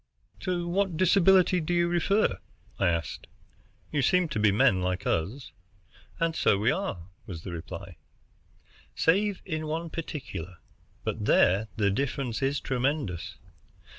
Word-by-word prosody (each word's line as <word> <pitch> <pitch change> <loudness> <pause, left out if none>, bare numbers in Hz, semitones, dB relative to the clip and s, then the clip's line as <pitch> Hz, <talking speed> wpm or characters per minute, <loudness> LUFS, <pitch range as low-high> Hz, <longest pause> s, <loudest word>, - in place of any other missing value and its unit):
"To 175 -2 -2
what 185 -1 0
disability 185 0 +5
do 175 +3 -1
you 170 0 +3
refer?" 175 - +1 0.4
I 95 - +3
asked. 85 -2 -2 0.6
"You 145 - +1
seem 180 +4 +3
to 110 - -2
be 105 -1 +4
men 100 -2 +3
like 90 0 -2
us." 100 - -2 0.7
"And 165 -1 0
so 100 - +3
we 110 +5 +2
are," 150 - -3 0.2
was 85 -4 -7
the 95 - -6
reply, 85 -1 -8 1.0
"save 195 +4 +2
in 155 -3 -3
one 165 +1 -3
particular, 95 - -6 0.5
but - - -3
there 100 +5 +4
the 100 -3 +2
difference 135 +1 -2
is 135 +1 +1
tremendous. 130 - -2
140 Hz, 135 wpm, -28 LUFS, -, 1.0 s, disability